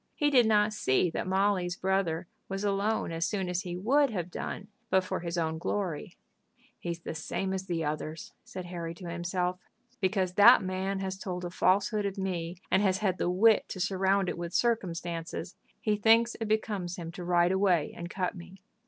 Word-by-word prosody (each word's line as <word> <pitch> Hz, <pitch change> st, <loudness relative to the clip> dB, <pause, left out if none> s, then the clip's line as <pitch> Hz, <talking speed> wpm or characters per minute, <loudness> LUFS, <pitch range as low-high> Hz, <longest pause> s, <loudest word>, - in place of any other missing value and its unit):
He 295 Hz, -2 st, +2 dB
did 245 Hz, -5 st, +6 dB
not 210 Hz, 0 st, +3 dB
see 170 Hz, -3 st, +2 dB
that -, -, -3 dB
Molly's 190 Hz, -2 st, +1 dB
brother 185 Hz, -3 st, 0 dB, 0.2 s
was 195 Hz, +1 st, -3 dB
alone 205 Hz, 0 st, 0 dB
as 165 Hz, +1 st, 0 dB
soon 195 Hz, -3 st, -2 dB
as 180 Hz, 0 st, -1 dB
he 175 Hz, -1 st, -5 dB
would 275 Hz, +9 st, +3 dB
have 180 Hz, -5 st, -4 dB
done 200 Hz, -, -5 dB, 0.2 s
but 190 Hz, 0 st, +3 dB
for -, -, -3 dB
his 170 Hz, 0 st, -4 dB
own 160 Hz, -1 st, -1 dB
glory. 175 Hz, -4 st, -3 dB, 0.6 s
"He -, -, -5 dB
is 170 Hz, 0 st, -4 dB
the -, -, -5 dB
same 190 Hz, +4 st, -3 dB
as 190 Hz, 0 st, -4 dB
the 165 Hz, -3 st, -1 dB
others," 155 Hz, +1 st, -4 dB
said 185 Hz, -1 st, -7 dB
Harry 170 Hz, -1 st, -5 dB
to 180 Hz, 0 st, -9 dB
himself. 180 Hz, +1 st, -2 dB, 0.4 s
"Because 190 Hz, -2 st, 0 dB
that 200 Hz, +1 st, +8 dB
man 190 Hz, +1 st, -2 dB
has 190 Hz, 0 st, -4 dB
told 180 Hz, -2 st, -4 dB
a 175 Hz, -, -5 dB
falsehood 200 Hz, +3 st, +2 dB
of 195 Hz, 0 st, -5 dB
me, 180 Hz, -3 st, -3 dB
and 190 Hz, -, +4 dB
has 190 Hz, -2 st, +2 dB
had 190 Hz, -2 st, 0 dB
the -, -, +1 dB
wit 210 Hz, +4 st, +4 dB
to 185 Hz, -, -6 dB
surround 195 Hz, +1 st, +1 dB
it 175 Hz, -, -3 dB
with 170 Hz, 0 st, -5 dB
circumstances, 175 Hz, -7 st, -1 dB, 0.2 s
he 215 Hz, -1 st, +1 dB
thinks 225 Hz, +3 st, +4 dB
it 225 Hz, -, -1 dB
becomes 205 Hz, -5 st, -1 dB
him 165 Hz, -2 st, -6 dB
to 180 Hz, 0 st, -8 dB
ride 175 Hz, 0 st, +3 dB
away 190 Hz, -5 st, +2 dB
and 170 Hz, 0 st, -6 dB
cut 185 Hz, -1 st, -2 dB
me." 185 Hz, +1 st, -12 dB
185 Hz, 195 wpm, -29 LUFS, 175-200 Hz, 0.6 s, that